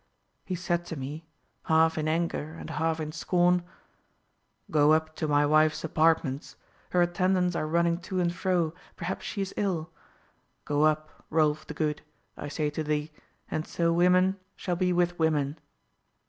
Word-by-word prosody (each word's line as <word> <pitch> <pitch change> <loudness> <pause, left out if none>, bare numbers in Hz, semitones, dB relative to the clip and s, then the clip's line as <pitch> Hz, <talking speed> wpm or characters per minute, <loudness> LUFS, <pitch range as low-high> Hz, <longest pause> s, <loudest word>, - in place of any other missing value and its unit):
He 185 - -3
said 175 -1 -1
to 165 - -5
me, 145 +4 -6 0.4
half 160 0 +4
in 155 -1 -1
anger 160 -1 -1
and - - -8
half 160 0 0
in 155 -1 -3
scorn: 175 +2 +2 1.1
'Go 150 0 +5
up 155 0 0
to 155 - -1
my 145 0 +3
wife's 155 +1 +3
apartments; 160 -3 +1 0.3
her 180 -1 +3
attendants 180 0 +1
are 155 - -1
running 170 +1 +2
to 185 +1 -3
and 175 -1 +1
fro, 175 -3 0 0.2
perhaps 180 +1 -4
she 200 - -3
is 190 - -6
ill. 175 -5 -1 0.7
Go 145 +1 +2
up, 155 0 -1
Rolf 155 -1 +1
the - - -7
Good, 150 -2 -1 0.3
I - - -6
say 150 0 -1
to 155 +1 -3
thee, 150 0 -1 0.4
and 155 - -2
so 165 -1 +1
women 185 +2 +4 0.2
shall 180 - -2
be 180 +1 +1
with 175 0 +1
women. 155 -2 +1
160 Hz, 160 wpm, -28 LUFS, 155-175 Hz, 1.1 s, Go